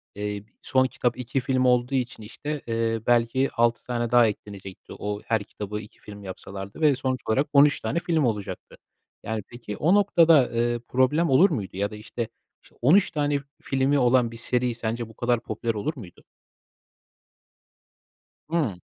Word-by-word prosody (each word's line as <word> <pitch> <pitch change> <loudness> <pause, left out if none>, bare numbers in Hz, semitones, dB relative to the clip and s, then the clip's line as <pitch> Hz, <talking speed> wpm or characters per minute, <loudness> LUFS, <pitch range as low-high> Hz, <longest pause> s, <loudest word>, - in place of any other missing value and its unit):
eee, 105 0 -4 0.2
son 130 0 +2
kitap 125 -1 -1
2 125 +2 -2
film 130 0 0
olduğu 125 +2 +2
için, 125 -3 -3
işte, 145 +7 -5
eee, 115 0 0
belki 120 +3 +2
6 120 0 +1
tane 120 -2 -2
daha 120 -2 +6
eklenecekti, 100 -2 -8
o 105 0 -4
her 110 -2 0
kitabı 105 +1 -6
2 105 - -13
film 100 -1 -11
yapsalardı 95 +5 -8
ve 150 -3 +5
sonuç 130 -2 -2
olarak 135 +7 +2
13 145 +1 +6
tane 170 - -1
film 165 -5 +1
olacaktı. 105 -4 -4 0.5
Yani, 110 -2 -3
peki, 120 -4 -8
o 170 +5 +3
noktada, 165 - +5
eee, 120 0 0
problem 140 +6 +2
olur 170 +10 +6
muydu 100 - -4
ya 100 +1 -1
da, - - -7
işte, 110 +2 -5 0.4
iş - - -21
13 180 +9 +5
tane 145 -2 0 0.2
filmi 135 +1 +1
olan 125 -1 +3
bir 115 - -9
seri 125 +1 -1
sence 115 0 -3
bu - - -14
kadar 120 -1 +1
popüler 115 +2 -2
olur 110 +10 -2
muydu? 95 -9 -12 2.3
Hıı. 155 - 0
120 Hz, 165 wpm, -25 LUFS, 110-135 Hz, 2.3 s, daha